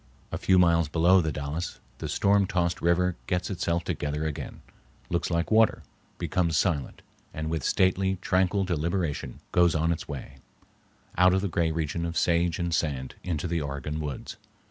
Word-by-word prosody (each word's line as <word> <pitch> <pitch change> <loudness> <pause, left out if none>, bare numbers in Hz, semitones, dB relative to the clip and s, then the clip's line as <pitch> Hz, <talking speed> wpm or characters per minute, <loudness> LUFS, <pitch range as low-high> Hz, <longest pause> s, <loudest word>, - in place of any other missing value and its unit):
A - - -2
few 95 - +3
miles 85 -3 +4
below 85 +4 +5
the 80 -2 -1
Dalles 75 +4 -4 0.2
the - - -4
storm 100 -1 +3
tossed 90 -2 0
river 90 +1 +2
gets 90 +1 -1
itself 85 -2 -1
together 75 +1 -2
again, 75 -2 -5 0.5
looks 85 0 0
like 85 +2 -1
water, 110 0 +4 0.3
becomes 85 -4 0
silent, 80 -6 -1 0.3
and 80 0 -3
with 80 -4 -2
stately, 95 +1 +2
tranquil 95 +2 +1
deliberation 85 -2 -2
goes 85 -1 +4
on 80 +1 +2
its 80 -1 -3
way, 70 -2 -7 0.8
out 90 +1 +6
of 95 - +1
the 100 - -1
gray 85 -2 0
region 80 +1 -2
of 85 - -4
sage 85 -1 +2
and 85 -1 -2
sand 70 -6 -1
into 85 -2 -2
the 85 -1 -1
Oregon 70 +2 -4
woods. 75 -3 -5
85 Hz, 165 wpm, -27 LUFS, 80-90 Hz, 0.8 s, out